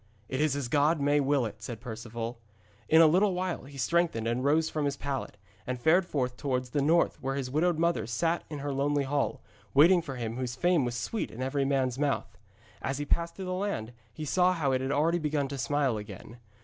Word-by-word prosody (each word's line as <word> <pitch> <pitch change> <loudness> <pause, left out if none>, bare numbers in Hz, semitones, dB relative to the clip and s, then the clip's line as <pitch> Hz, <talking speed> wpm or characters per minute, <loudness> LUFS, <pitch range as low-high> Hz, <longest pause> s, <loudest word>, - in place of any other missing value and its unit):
'It 130 +2 -1
is 155 -3 +2
as 140 -4 -2
God 150 +5 +2
may 145 +1 +3
will 140 -2 +2
it,' 110 0 -7
said 115 +1 -6
Perceval. 115 0 -6 0.5
In 160 +1 +7
a - - +8
little 185 +4 +4
while 180 -5 -3
he 140 0 -11
strengthened 155 -4 +1
and 120 +2 -1
rose 155 +3 +3
from 155 -2 -2
his 140 0 -1
pallet, 135 -6 -4 0.3
and 125 0 -3
fared 170 +7 +3
forth 125 -5 -2
towards 125 -3 -2
the 145 - +1
north 165 +4 +2
where 135 0 -2
his 130 -2 -3
widowed 165 +3 +2
mother 170 -6 +1
sat 165 +9 0
in 150 - -5
her 145 - -1
lonely 140 +1 +1
hall, 140 +1 -1 0.3
waiting 170 +5 +7
for 135 -5 -6
him 115 -1 -4
whose 125 -2 -3
fame 175 -6 +2
was 120 -1 -3
sweet 120 - -3
in 125 +3 -6
every 135 +1 0
man's 135 -2 0
mouth. 140 -6 -1 0.5
As 135 +1 -2
he 145 - -3
passed 170 +3 -1
through 190 - -6
the 185 - -2
land, 185 - -3 0.2
he 155 +7 -6
saw 180 +4 +3
how 150 -6 0
it 130 0 +1
had 135 +1 -2
already 160 +4 +2
begun 150 -3 0
to 140 - -5
smile 135 -1 +1
again. 105 +2 -9
140 Hz, 225 wpm, -29 LUFS, 125-160 Hz, 0.5 s, a